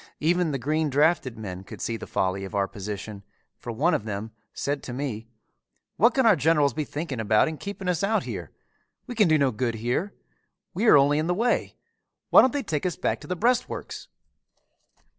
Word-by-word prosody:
Even 175 +2 +2
the 140 - -1
green 155 +4 0
drafted 145 -3 +2
men 95 -4 -7
could - - -11
see 115 - -2
the 115 - -8
folly 95 +1 -1
of 95 +2 -7
our 100 -1 +1
position, 105 0 -7 0.4
for 120 - -6
one 150 +10 +1
of - - 0
them 105 +1 -5 0.2
said 140 0 -3
to 125 - -7
me, 120 -4 -4 0.7
"What 235 +4 +4
can 265 -2 +3
our 220 -4 +6
generals 150 -4 +2
be 155 -1 -2
thinking 145 -5 -5
about 110 +3 +3
in 155 -1 -4
keeping 200 -2 -6
us 180 -1 0
out 220 +2 +1
here! - - -6 0.6
We 250 - -6
can 215 -5 +4
do 155 -1 +4
no 140 -3 +2
good 115 0 -2
here. 120 - -2 0.6
We 215 +7 0
are 150 - +8
only 145 +2 +4
in 155 - -1
the 180 - +1
way. 235 +5 0 0.6
Why - - +9
don't 260 - +3
they 285 -1 -2
take 160 -4 -1
us 180 - -3
back - - -1
to - - -11
the 180 - -2
breastworks?" 240 +7 -1
145 Hz, 205 wpm, -25 LUFS, 115-180 Hz, 0.7 s, Why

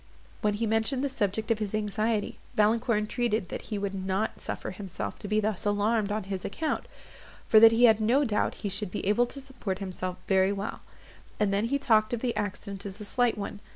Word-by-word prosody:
When 210 -1 +1
he 230 +2 -1
mentioned 225 +5 0
the 280 - +1
subject 220 -3 -1
of 220 - +2
his 215 -1 -2
anxiety, 215 +1 -1 0.2
Valancourt 225 +2 +3
entreated 215 -2 -1
that - - -6
he 215 - -2
would 200 -1 -2
not 190 +2 -2
suffer - - -4
himself 185 - -6
to - - -6
be 215 +1 +2
thus 215 -2 -1
alarmed 205 0 +1
on 215 0 -1
his 190 -1 -4
account, 315 +9 -2 0.6
for 220 - +7
that 225 0 +9
he 230 +2 +3
had 220 -2 +6
no 245 +7 +3
doubt 220 -6 0
he - - +1
should 195 +1 -1
be - - -4
able 210 +5 +3
to 275 - -7
support 260 -8 -5
himself 185 -2 -4
very 190 0 +4
well; 200 0 -4 0.6
and 205 -2 +2
then 200 +2 +1
he 275 +5 +1
talked 220 -4 +3
of 230 - -7
the 245 -2 -1
accident 200 -1 -4
as 200 +1 -5
a 210 - -5
slight 245 +2 +2
one. 205 0 -5
210 Hz, 215 wpm, -28 LUFS, 200-230 Hz, 0.6 s, that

